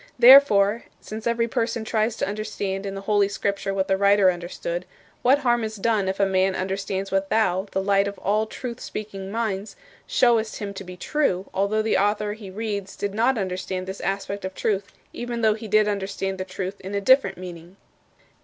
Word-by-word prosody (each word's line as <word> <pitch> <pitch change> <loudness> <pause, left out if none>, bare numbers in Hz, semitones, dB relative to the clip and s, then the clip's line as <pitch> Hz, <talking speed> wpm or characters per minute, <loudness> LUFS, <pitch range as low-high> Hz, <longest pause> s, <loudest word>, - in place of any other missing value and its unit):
Therefore, 235 -4 +7
since 220 +2 -6
every 235 0 +1
person 230 0 -2
tries 220 0 0
to - - -2
understand 200 -1 -3
in 195 - -5
the 195 - -5
Holy 205 0 +2
Scripture 200 0 -2
what 195 -1 -1
the 190 - +2
writer 200 -1 +5
understood, 175 0 -5 0.3
what 260 +3 +5
harm 240 -4 +1
is 220 0 -4
done 210 -1 +1
if 190 - -3
a 200 - +4
man 190 0 +2
understands 195 +1 -3
what 195 0 0
thou, 195 -3 +1
the 190 - -1
Light 200 0 +3
of 200 - -5
all 215 +2 0
truth 240 +1 -6
speaking 195 -2 -6
minds, 210 -2 -3 0.3
showest 230 -3 +2
him 200 -1 -5
to 195 - -7
be 180 -1 -10
true, 195 - 0
although 200 +3 +1
the 220 - +2
author 205 +1 +1
he 210 -2 -10
reads 200 -1 -4
did 200 -1 -3
not 235 +4 +2
understand 185 -1 -3
this 190 +1 -6
aspect 195 +2 -3
of 190 0 -5
the - - -12
truth 200 -2 0 0.3
even 240 -1 -4
though 220 -1 +4
he 220 +1 -7
did 215 +1 +4
understand 195 -1 -2
the 185 - -3
truth 185 +1 -5
in 195 +2 -5
a - - +1
different 260 +1 +4
meaning? 175 0 -10
200 Hz, 200 wpm, -24 LUFS, 190-220 Hz, 0.3 s, Therefore